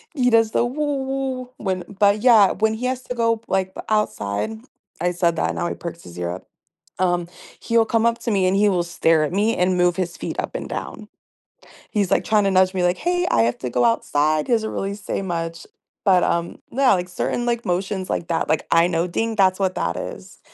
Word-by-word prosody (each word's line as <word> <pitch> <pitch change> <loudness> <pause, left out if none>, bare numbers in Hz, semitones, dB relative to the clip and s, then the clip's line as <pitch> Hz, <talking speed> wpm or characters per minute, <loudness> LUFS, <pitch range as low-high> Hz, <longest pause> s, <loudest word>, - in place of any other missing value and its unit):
he 250 -3 +3
does 225 -1 +4
the 235 - +2
"woo 280 +2 -2
woo" 265 -1 -3
when 185 -3 -2 0.2
but, 205 0 +4
yeah, 220 -5 +6
when 220 +2 +1
he 240 +3 -3
has 255 0 -3
to 250 - -5
go, 230 -1 +2
p 220 - -24
but, - - -12
like, 190 -1 0
outside- 160 - -1 0.5
I 175 +1 +1
said 170 -1 +1
that, - - 0
now - - -1
he - - -3
perks 170 0 -8
his 85 0 -12
ear 85 0 -2
up- 90 - -8 0.5
um, 175 -2 0 0.3
he'll 230 -1 +2
come 225 0 +1
up 235 0 +1
to 235 - -2
me 190 -3 +2
and 185 - +2
he 205 +1 +4
will 180 -3 +1
stare 165 -2 +2
at 150 - -5
me 210 +4 +1
and 180 0 +2
move 180 -1 +2
his 175 -2 -2
feet - - -5
up - - -4
and - - -5
down. 215 -1 -6 0.8
He's, 205 -4 0
like, - - +2
trying 215 -2 +2
to 195 - +2
nudge 185 0 +4
me 185 -2 -1
like, 180 0 +2
“Hey, 355 - 0
I 115 - +4
have 115 +1 0
to 125 - -4
go 120 0 +1
outside.” 150 +6 +1
He 245 - +2
doesn't 220 -1 -1
really 195 +1 -3
say 200 -1 -4
much, 165 -2 -4 0.4
but, 185 -3 +4
um, 170 0 -1
yeah, 260 -2 +4
like, 180 -1 -2
certain, 240 +6 -2
like, 235 -1 -1
motions 185 +1 -2
like 170 - -2
that. 165 - -1
Like, 155 - 0
I 165 0 +5
know 170 -1 0
“ding,” 225 +5 -2
that's 185 -2 +3
what 190 -1 +1
that 85 0 -1
is - - -8
190 Hz, 235 wpm, -22 LUFS, 175-225 Hz, 0.8 s, yeah